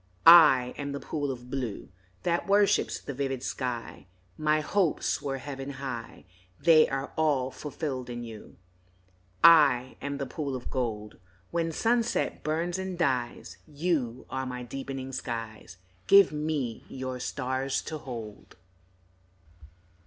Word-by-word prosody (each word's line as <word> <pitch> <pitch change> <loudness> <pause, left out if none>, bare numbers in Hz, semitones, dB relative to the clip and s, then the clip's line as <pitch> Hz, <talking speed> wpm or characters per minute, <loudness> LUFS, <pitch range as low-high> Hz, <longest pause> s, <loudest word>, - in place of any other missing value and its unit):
I 150 -7 +8
am 140 0 -3
the 140 - -4
pool 145 -1 -3
of 125 -1 -7
blue 125 -7 -4 0.3
That 170 0 0
worships 200 0 +3
the 140 - -6
vivid 135 -1 -3
sky; 120 -6 -4 0.3
My 155 0 +2
hopes 175 +2 0
were 135 -1 -3
heaven 135 0 -6
high, 130 -4 -7 0.3
They 160 -2 +6
are 135 +1 -3
all 140 -5 +1
fulfilled 135 -4 -5
in 120 0 -5
you. 110 -2 -10 0.9
I 140 -6 +6
am 140 0 -3
the 140 - -3
pool 140 0 -4
of 125 - -7
gold 110 -5 -3 0.3
When 165 -1 0
sunset 235 +6 0
burns 170 +4 -1
and 190 -1 -4
dies, 130 -8 -1
You 145 -6 -2
are 130 0 -3
my 125 -1 -5
deepening 135 +1 -6
skies, 115 -7 -6 0.3
Give 200 -2 +7
me 150 -6 -2
your 130 -1 -5
stars 130 +1 -2
to 155 - -5
hold. 115 -6 -9
135 Hz, 130 wpm, -28 LUFS, 125-155 Hz, 0.9 s, I